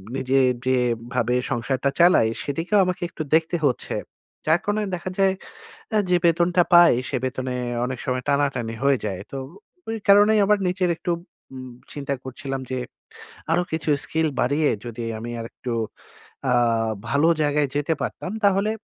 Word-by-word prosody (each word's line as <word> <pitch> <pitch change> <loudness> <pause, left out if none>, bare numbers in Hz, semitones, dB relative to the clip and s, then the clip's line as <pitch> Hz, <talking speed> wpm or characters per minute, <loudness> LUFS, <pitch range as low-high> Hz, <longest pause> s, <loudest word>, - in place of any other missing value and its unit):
নিজের 130 0 +2 0.2
যেভাবে 125 -1 0 0.2
সংসারটা 130 +3 0
চালাই, 170 -9 +6 0.2
সেদিকেও 165 +8 0
আমাকে 180 0 -3
একটু 155 - -5
দেখতে 165 +2 +1
হচ্ছে। 130 - -1 0.5
যার 160 +2 +4
কারণে 205 +1 0
দেখা 175 +1 -5
যায় 195 -1 +4 0.6
আ - - +5
যে 180 - +5
বেতনটা 170 +1 +3
পাই, 175 -4 +8
সে 135 - -2
বেতনে 130 -1 -3 0.3
অনেক 130 0 -3
সময় 125 -1 -1
টানাটানি 135 -5 0
হয়ে 140 -1 +4
যায়। 95 -3 -4
তো - - -4 0.5
ঐ - - -1 0.2
কারণেই 205 +2 +6
আবার 210 +1 +3
নিচচে 180 +1 0
একটু 175 - -3 0.4
উম 130 -1 -8 0.2
চিন্তা 140 -1 -3
করছিলাম 135 +1 -5
যে 130 - -1 0.7
আরো 175 +2 +3
কিছু 160 -1 -2
স্কিল 160 0 0
বাড়িয়ে 145 +4 +2 0.2
যদি 120 0 -6 0.2
আমি 120 +2 -6
আরেকটু 115 +1 -6 0.8
আ - - +4 0.6
ভালো 140 +4 +3
জায়গায় 145 -1 +1
যেতে 145 +3 +1
পারতাম, 185 - -4
তাহলে 200 +1 +3
145 Hz, 150 wpm, -23 LUFS, 130-175 Hz, 0.8 s, পাই